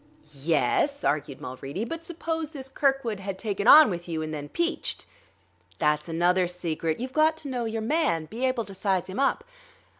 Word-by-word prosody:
"Yes," 170 - +1
argued 145 -2 -1
Mulready; 135 - -5
"but 330 +6 -6
suppose 325 -2 -3
this 270 -4 -8
Kirkwood 270 -7 0
had 195 -1 -5
taken 205 0 -2
on 305 -7 +9
with 175 0 -5
you 160 -1 -2
and 155 0 -5
then 145 -1 -5
peached?" 340 +1 -2 0.7
"That's 150 +1 +1
another 175 +2 +2
secret; 165 -2 -2
you've 255 +2 -5
got 315 +1 +3
to 310 - -7
know 250 -3 -2
your 225 0 -3
man, 220 - +1
be 225 +10 -6
able 250 -3 -1
to 195 - -9
size 190 -2 0
him 190 +4 -6
up. 275 - +1
200 Hz, 180 wpm, -26 LUFS, 165-275 Hz, 0.7 s, on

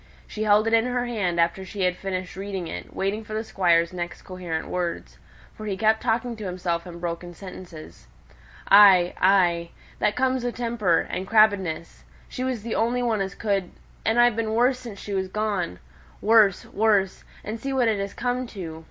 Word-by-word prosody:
She 215 - -7
held 215 0 +4
it 225 - 0
in 225 +1 +4
her 245 0 -1
hand 195 -8 -1
after 170 +3 +1
she 190 +1 -4
had 180 -1 +2
finished 185 -1 -5
reading 190 -2 -5
it, 90 - -7
waiting 200 +3 -2
for 215 0 -7
the 220 - -2
Squire's 170 -5 +2
next 175 -1 -5
coherent 180 -4 -5
words; 175 -2 -4 0.3
for 215 - -8
he 195 -2 -2
kept 220 +1 +2
talking 235 +1 0
to 215 - -7
himself 180 -2 -3
in 170 -1 -9
broken 175 0 -5
sentences. 165 - -11 0.6
"Ay, 195 -3 +7
ay! 175 -3 +3 0.3
that 210 - +1
comes 260 -1 +1
o' 245 - 0
temper, 230 -8 +1
and 185 +1 -5
crabbedness. 200 -7 +2 0.2
She 255 - -5
was 255 -5 -2
the 230 - -3
only 245 +2 +1
one 225 -4 0
as 195 0 -3
could, 200 -4 -1 0.3
and 225 +2 +2
I've 240 -2 +5
been 220 -1 -1
worse 250 +2 +3
since 230 -5 -9
she 205 - -6
was 190 -1 -1
gone. 200 - -2 0.4
Worse! 215 -3 +4
worse! 205 -3 +1 0.2
and 220 +2 -5
see 270 +4 -4
what 260 -3 +2
it 215 -3 +1
has 200 0 -4
come 250 0 -2
to! 170 -8 -7
200 Hz, 190 wpm, -24 LUFS, 180-225 Hz, 0.6 s, Ay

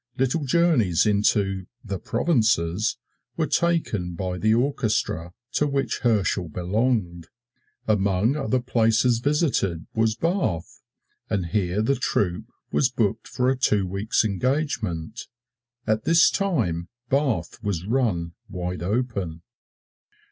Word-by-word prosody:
Little 135 +3 0
journeys 130 - +3
into 100 -2 +1 0.2
"the 100 -3 -4
provinces" 110 - +1 0.4
were 160 - +2
taken 145 - 0
by 90 +1 -3
the 110 +3 +2
orchestra 110 - 0 0.2
to 150 - +1
which 140 -1 -1
Herschel 100 -7 +1
belonged. 90 - -1 0.6
Among 100 +3 +2
other 130 -3 0
places 115 -1 +2
visited 125 - 0
was 110 -1 +1
Bath, 165 - -2 0.5
and 100 -5 0
here 95 +3 0
the 140 - +2
troupe 100 -8 -1 0.2
was 75 -2 +3
booked - - -1
for 125 - -1
a - - +1
two 105 -6 +2
weeks' 100 +5 0
engagement. 110 - -2 0.6
At 110 +1 0
this 165 +1 +5
time 105 - -1 0.2
Bath 130 - 0
was 100 -5 -2
run 105 -9 0 0.2
wide 90 -2 -4
open. 95 -5 -2
110 Hz, 115 wpm, -24 LUFS, 90-130 Hz, 0.6 s, this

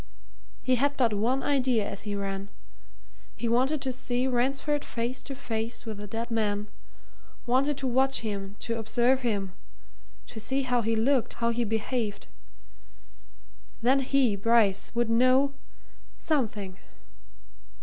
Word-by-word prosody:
He 255 -1 +3
had 285 +3 +1
but 235 -4 +3
one 240 +6 +1
idea 255 -7 +2
as 200 - -6
he 205 -1 -4
ran 195 0 -4 0.9
he 235 - -3
wanted 265 +5 +2
to 265 - -1
see 250 0 -1
Ransford 275 +4 +1
face 240 +2 -3
to 275 - -6
face 230 -2 -3
with 220 -2 -5
the 205 - -6
dead 230 +3 -4
man 210 -2 0 0.8
wanted 265 +3 +2
to 270 - -3
watch 265 +2 +2
him, 200 -3 -4
to 230 -1 -2
observe 240 +4 +2
him, 200 -6 -1 0.7
to 225 - -9
see 265 +5 0
how 250 -2 +1
he 225 0 0
looked, 250 +3 +2
how 235 0 +1
he 240 +1 0
behaved. 220 -1 -2 1.6
Then 260 +3 +4
he, 265 -4 +2
Bryce, 205 -1 +3
would 240 0 +2
know 255 +4 +4 0.6
something. 210 - -1
235 Hz, 140 wpm, -28 LUFS, 215-260 Hz, 1.6 s, Then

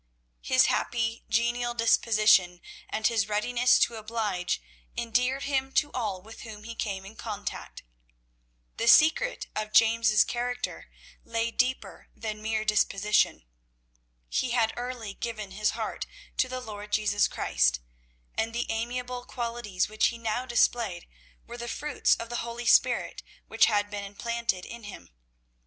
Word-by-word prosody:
His - - +4
happy 230 -1 -1
genial 240 +2 +1
disposition 215 -6 +4 0.3
and 220 0 -3
his 220 -2 +2
readiness 240 +4 +3
to 235 - +2
oblige 210 - -2 0.4
endeared 250 +4 0
him 270 -1 -1
to 295 - +2
all 205 -7 -3
with 220 +2 -12
whom 215 -2 -9
he 230 +1 -7
came 195 -4 -4
in 205 +3 -11
contact. 210 -3 -6 0.9
The 230 - -1
secret 320 - +5
of 215 0 -3
James' 225 -1 +5
character 245 +1 -4 0.3
lay 230 0 -1
deeper 255 +2 -1
than 215 -1 -5
mere 220 0 -1
disposition. 210 - +2 0.8
He 255 - -1
had 235 -2 +2
early 240 -4 -5
given 215 -3 -5
his 210 +2 -1
heart - - -4 0.3
to 255 - +2
the 255 0 -4
Lord 210 -3 -8
Jesus 205 -1 +2
Christ, - - +1 0.5
and 225 +1 -2
the 240 - 0
amiable 245 +2 -3
qualities 235 -6 -2
which 215 +1 +2
he 235 - -4
now 230 +2 -2
displayed 235 -6 +1 0.4
were 235 +1 -9
the 235 0 -6
fruits 295 +3 +1
of 230 - -7
the 240 - -3
Holy 235 +1 -5
Spirit - - +3 0.3
which 225 - +4
had 205 -2 +1
been 205 -1 -4
implanted 210 -1 -2
in 235 -2 -9
him. 205 - -10
230 Hz, 145 wpm, -28 LUFS, 210-240 Hz, 0.9 s, secret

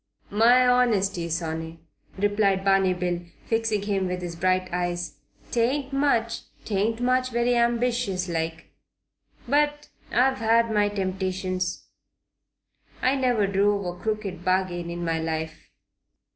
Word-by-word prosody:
"My 240 +4 +5
honesty, 200 -8 +2
sonny," 160 0 -4 0.4
replied 200 -1 +1
Barney 195 -1 +3
Bill, 175 -1 -2 0.2
fixing 225 -3 0
him 195 -2 0
with 180 0 -3
his 170 -1 -5
bright 185 +2 +1
eyes. 175 -4 -2 0.3
"'Tain't 265 +4 0
much. 275 -5 +1 0.3
'Tain't 215 +2 0 0.3
very 240 0 +1
ambitious 235 -5 +1
like. 165 -1 -4 0.8
But 295 0 +1 0.2
I've 260 +2 +3
had 230 0 +3
my 210 -1 +2
temptations. 185 -2 -2 1.2
I 255 - +4
never 250 -6 +2
drove 200 0 +1
a 175 0 -3
crooked 210 -5 -3
bargain 185 -2 0
in 170 0 -4
my 165 -1 0
life." 160 -1 -4
195 Hz, 115 wpm, -25 LUFS, 180-230 Hz, 1.2 s, My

